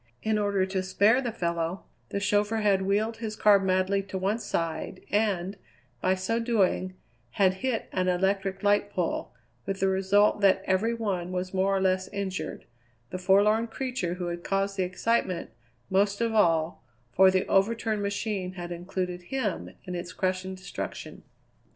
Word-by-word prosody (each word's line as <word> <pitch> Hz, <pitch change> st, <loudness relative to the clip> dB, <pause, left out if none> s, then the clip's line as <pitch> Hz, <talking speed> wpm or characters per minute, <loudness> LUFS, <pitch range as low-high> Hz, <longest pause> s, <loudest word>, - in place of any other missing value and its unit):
In 215 Hz, -1 st, +1 dB
order 200 Hz, -2 st, +1 dB
to 190 Hz, 0 st, -2 dB
spare 205 Hz, +6 st, +3 dB
the 245 Hz, -3 st, -2 dB
fellow, 170 Hz, -2 st, -2 dB, 0.3 s
the 200 Hz, -, -2 dB
chauffeur 210 Hz, +2 st, +1 dB
had 200 Hz, -2 st, +3 dB
wheeled 210 Hz, +4 st, 0 dB
his 220 Hz, -2 st, -4 dB
car 210 Hz, -2 st, +5 dB
madly 190 Hz, +1 st, +1 dB
to 190 Hz, -1 st, -6 dB
one 195 Hz, +4 st, 0 dB
side, 165 Hz, -2 st, -3 dB
and, 200 Hz, -2 st, 0 dB, 0.4 s
by 185 Hz, +1 st, +2 dB
so 190 Hz, +5 st, -1 dB
doing, 195 Hz, -5 st, +1 dB, 0.4 s
had 190 Hz, -2 st, +3 dB
hit 260 Hz, -3 st, -1 dB
an 185 Hz, -1 st, 0 dB
electric 195 Hz, +1 st, 0 dB
light 205 Hz, 0 st, +3 dB
pole, 180 Hz, -4 st, -2 dB, 0.4 s
with 195 Hz, 0 st, -2 dB
the 195 Hz, -, +2 dB
result 195 Hz, +2 st, +3 dB
that 195 Hz, -1 st, +4 dB
every 215 Hz, +5 st, +1 dB
one 190 Hz, -6 st, -2 dB
was 185 Hz, +1 st, -3 dB
more 195 Hz, +1 st, +2 dB
or -, -, +1 dB
less 185 Hz, 0 st, +1 dB
injured, 195 Hz, -2 st, -4 dB, 0.5 s
the 185 Hz, -, -4 dB
forlorn 205 Hz, +5 st, +4 dB
creature 230 Hz, -7 st, -3 dB
who 180 Hz, -1 st, -4 dB
had 175 Hz, 0 st, -5 dB
caused 195 Hz, 0 st, 0 dB
the 195 Hz, -, -1 dB
excitement, 185 Hz, -, -1 dB, 0.4 s
most 200 Hz, +1 st, +2 dB
of 230 Hz, -1 st, 0 dB
all, 165 Hz, -6 st, +2 dB, 0.3 s
for 190 Hz, +8 st, +6 dB
the 185 Hz, 0 st, +1 dB
over 195 Hz, +4 st, +3 dB
turned 220 Hz, -2 st, -2 dB
machine 200 Hz, -2 st, -2 dB
had 175 Hz, -2 st, -7 dB
included 180 Hz, +1 st, -4 dB
him 205 Hz, -, -2 dB
in 180 Hz, -, -6 dB
its 175 Hz, +1 st, -5 dB
crushing 185 Hz, 0 st, -2 dB
destruction. 185 Hz, 0 st, -7 dB
195 Hz, 165 wpm, -27 LUFS, 185-210 Hz, 0.5 s, for